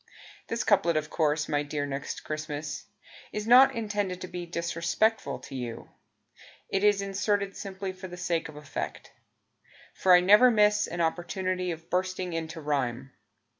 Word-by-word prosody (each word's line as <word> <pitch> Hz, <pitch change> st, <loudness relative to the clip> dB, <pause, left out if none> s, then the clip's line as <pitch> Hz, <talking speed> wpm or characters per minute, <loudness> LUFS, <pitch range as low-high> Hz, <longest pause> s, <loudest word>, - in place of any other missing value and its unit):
This 230 Hz, +1 st, -2 dB
couplet, 170 Hz, -6 st, +3 dB
of 150 Hz, 0 st, -3 dB
course. 150 Hz, -2 st, +1 dB
My 145 Hz, -1 st, +1 dB
dear 145 Hz, 0 st, -3 dB
Next 140 Hz, 0 st, -5 dB
Christmas, 155 Hz, -1 st, -5 dB, 0.5 s
Is 210 Hz, 0 st, -4 dB
not 250 Hz, +4 st, +7 dB
intended 205 Hz, -5 st, -2 dB
to 185 Hz, -, -5 dB
be 175 Hz, -1 st, -6 dB
Disrespectful 170 Hz, +6 st, 0 dB
to -, -, -11 dB
you; 120 Hz, -3 st, -6 dB, 0.8 s
It 195 Hz, +1 st, 0 dB
is 205 Hz, -1 st, +4 dB
inserted 200 Hz, 0 st, -1 dB
simply 190 Hz, -1 st, -5 dB
For 185 Hz, 0 st, -9 dB
the 180 Hz, 0 st, -9 dB
sake 170 Hz, -2 st, -1 dB
of 155 Hz, -, -11 dB
effect. 150 Hz, -1 st, -6 dB, 0.8 s
For 185 Hz, -, +4 dB
I -, -, +7 dB
never 210 Hz, +7 st, +7 dB
miss 210 Hz, -2 st, +3 dB
an 175 Hz, 0 st, -3 dB
opportunity 180 Hz, +2 st, -1 dB
Of 165 Hz, -1 st, -7 dB
bursting 185 Hz, 0 st, -1 dB
into 165 Hz, 0 st, -4 dB
rhyme. 135 Hz, -3 st, -2 dB
180 Hz, 155 wpm, -28 LUFS, 155-200 Hz, 0.8 s, not